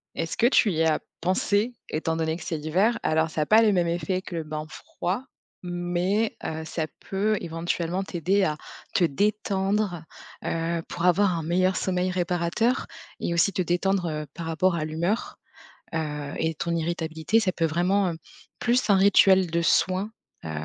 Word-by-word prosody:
Est-ce 165 0 -3
que 240 - +5
tu 235 -4 +4
y 165 -1 +1
as 160 -1 +2 0.2
pensé 205 +6 +1 0.2
étant 160 +1 -1
donné 160 0 -1
que - - -9
c'est 160 - -3
l'hiver? 185 +10 +1
Alors 160 +1 +2
ça 155 - -2
a - - +1
pas 220 +7 +6
les 220 -2 +4
mêmes 175 -3 +2
effet 180 +2 -1
que 180 - -8
le 165 - -2
bain 155 0 -5
froid 185 +8 -4 0.4
mais, 175 +5 0
heu, 160 0 -3
ça 160 0 -3 0.2
peut 210 +2 +1
éventuellement 170 +2 -2
t'aider 190 +2 +1
à 155 -4 +1 0.4
te 185 - +3
détendre, 195 +1 0 0.4
heu, 165 0 -1
pour 175 0 -3
avoir 185 +2 +4
un - - -3
meilleur 185 +4 +1
sommeil 185 0 0
réparateur 180 +6 0 0.3
et 170 - -1
aussi 170 +4 +3
te 185 0 -1
détendre, 180 +2 +1
heu, 155 -1 -3
par 170 - -5
rapport 165 +3 +1
à 155 -2 -1
l'humeur, 170 +8 -2 0.6
heu 150 -3 -3
et 160 0 0
ton 170 +3 -2
irritabilité. 165 +4 0
Ça 200 -4 +1
peut 170 - -1
vraiment, 180 +4 +2
heu, - - -7 0.4
plus 240 -1 +1
un 200 - +6
rituel 190 -2 +5
de 170 +1 +1
soin. 185 +4 +2 0.3
Heu, 80 - -5
175 Hz, 175 wpm, -26 LUFS, 165-195 Hz, 0.6 s, pas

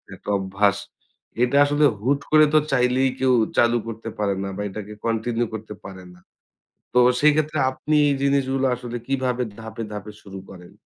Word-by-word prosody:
একটা - - -10
অভ্যাস। 100 +1 +1 0.7
এটা 125 +3 +2
আসলে 145 +1 +2 0.2
হুট 140 +5 +1
করে 155 0 +7
তো 155 - +6
চাইলেই 130 +1 +2
কেউ 130 -1 +3 0.2
চালু 120 0 +4
করতে 115 0 -6
পারে 100 -2 0
না 100 - -4
বা - - -3
এটাকে 105 +1 -8
কন্টিনিউ 115 +1 -1
করতে 110 -1 -7
পারে 95 -1 -9
না। 90 - -19 0.7
তো 125 - +4 0.2
সেই 150 +1 +5
ক্ষেত্রে 155 0 -1
আপনি 150 +3 -2
এই 140 - +1
জিনিসগুলো 135 -1 +1
আসলে 120 0 -6
কিভাবে 130 -2 -1 0.2
ধাপে, 110 0 -7
ধাপে 105 +1 -7
শুরু 95 -1 -10
করেন? 90 -2 -13
120 Hz, 170 wpm, -22 LUFS, 105-135 Hz, 0.7 s, করে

